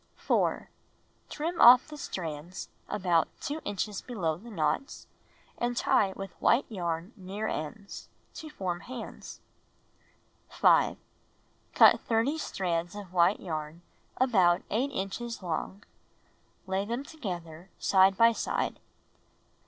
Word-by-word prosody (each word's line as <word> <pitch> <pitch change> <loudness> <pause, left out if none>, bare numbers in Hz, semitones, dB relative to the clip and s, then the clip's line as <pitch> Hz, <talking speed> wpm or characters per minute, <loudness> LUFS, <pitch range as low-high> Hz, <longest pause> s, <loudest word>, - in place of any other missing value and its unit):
OU - - -23
4. - - +1 0.6
Trim 330 +3 -3
off 250 +2 +9
the 305 - -9
strands 170 - -6 0.2
about 175 -4 +2
2 300 +2 -4
inches 205 0 -3
below 180 -11 -2
the 215 +9 -12
knots, 235 +5 -2 0.5
and 240 0 -1
tie 195 -5 +3
with 195 -1 -7
white 240 +4 +4
yarn 175 -1 -3
near 195 +2 -5
ends 195 +6 -6
— - - -39
to 315 - -8
form 185 -10 -3
hands. 245 +4 -9 1.1
5. - - +4 0.8
Cut - - +7
30 240 +7 0
strands 175 - -2
of 200 -3 -9
white 175 +3 +3
yarn 160 -1 -5 0.3
about 190 -9 +3
8 250 +7 +1
inches 230 0 -4
long. 180 +3 -4 0.8
Lay 190 +1 -1
them 235 +6 -3
together, 180 - -7
side 190 0 +4
by 230 0 +6
side. 225 - -2
195 Hz, 120 wpm, -29 LUFS, 175-235 Hz, 1.1 s, off